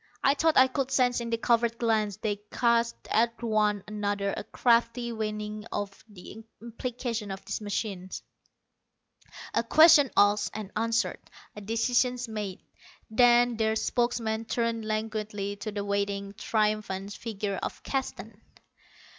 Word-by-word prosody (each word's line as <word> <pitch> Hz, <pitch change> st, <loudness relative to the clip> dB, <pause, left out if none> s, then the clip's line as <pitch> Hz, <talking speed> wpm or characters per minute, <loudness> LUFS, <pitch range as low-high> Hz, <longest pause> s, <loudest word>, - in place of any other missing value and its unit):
I 275 Hz, -, +5 dB
thought 320 Hz, +2 st, +2 dB
I 260 Hz, -, +9 dB
could 260 Hz, 0 st, -2 dB
sense 250 Hz, -2 st, +2 dB
in 235 Hz, -, -4 dB
the 230 Hz, -, 0 dB
covert 235 Hz, 0 st, +1 dB
glances 215 Hz, -4 st, 0 dB
they 205 Hz, -2 st, -2 dB
cast 235 Hz, -1 st, +2 dB, 0.2 s
at 230 Hz, +1 st, +2 dB
one 210 Hz, -3 st, +1 dB
another 205 Hz, -1 st, -2 dB
a -, -, -5 dB
crafty 235 Hz, +1 st, +1 dB
weighing 215 Hz, -1 st, -4 dB
of 200 Hz, -1 st, -4 dB
the 205 Hz, +2 st, -11 dB, 0.2 s
implications 235 Hz, -2 st, -4 dB
of 195 Hz, 0 st, -7 dB
this -, -, -4 dB
machine; 200 Hz, -2 st, -3 dB, 1.4 s
a -, -, +2 dB
question 300 Hz, +3 st, +7 dB
asked 205 Hz, 0 st, +4 dB
and 210 Hz, -2 st, -6 dB
answered; 230 Hz, +1 st, 0 dB, 0.4 s
a 210 Hz, -, -8 dB
decision 245 Hz, +4 st, +1 dB, 0.2 s
made. 205 Hz, -4 st, -5 dB, 0.5 s
Then 240 Hz, 0 st, +5 dB
their 220 Hz, 0 st, +1 dB
spokesman 230 Hz, -1 st, -1 dB
turned 230 Hz, -1 st, -1 dB
languidly 215 Hz, -2 st, -3 dB
to 215 Hz, +1 st, -5 dB
the 205 Hz, -1 st, -4 dB
waiting, 200 Hz, 0 st, -2 dB
triumphant 210 Hz, -2 st, -1 dB
figure 205 Hz, -3 st, -4 dB
of -, -, -5 dB
Keston. 225 Hz, -5 st, -4 dB
220 Hz, 135 wpm, -28 LUFS, 205-235 Hz, 1.4 s, I